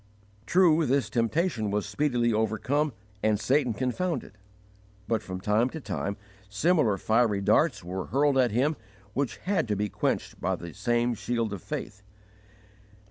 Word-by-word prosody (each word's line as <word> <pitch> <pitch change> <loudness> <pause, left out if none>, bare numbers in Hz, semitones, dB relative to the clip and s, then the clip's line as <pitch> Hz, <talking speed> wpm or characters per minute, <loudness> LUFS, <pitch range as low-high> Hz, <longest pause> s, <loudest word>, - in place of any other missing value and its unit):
* 100 0 -31
True, 165 -4 +4
this 130 -5 +1
temptation 115 - 0
was 105 0 -1
speedily 120 -6 +1
overcome 110 +8 0 0.3
and 105 -1 +2
Satan 130 -1 +1
confounded; 130 - -2 0.7
but 115 -2 +1
from 95 -3 -6
time 105 +5 +2
to 160 - -7
time 100 -7 -3 0.3
similar 115 - +2
fiery 110 -1 +2
darts 105 - +2
were 90 +2 -4
hurled 140 +3 +2
at 125 -2 +4
him 130 +8 +1 0.4
which 135 +1 -1
had 190 -8 -1
to 105 - 0
be 105 +1 -1
quenched - - -2
by - - 0
the 85 -2 -9
same 120 0 +1
shield 115 -1 -2
of 95 - -6
faith. 95 - -6
120 Hz, 150 wpm, -27 LUFS, 105-140 Hz, 0.7 s, True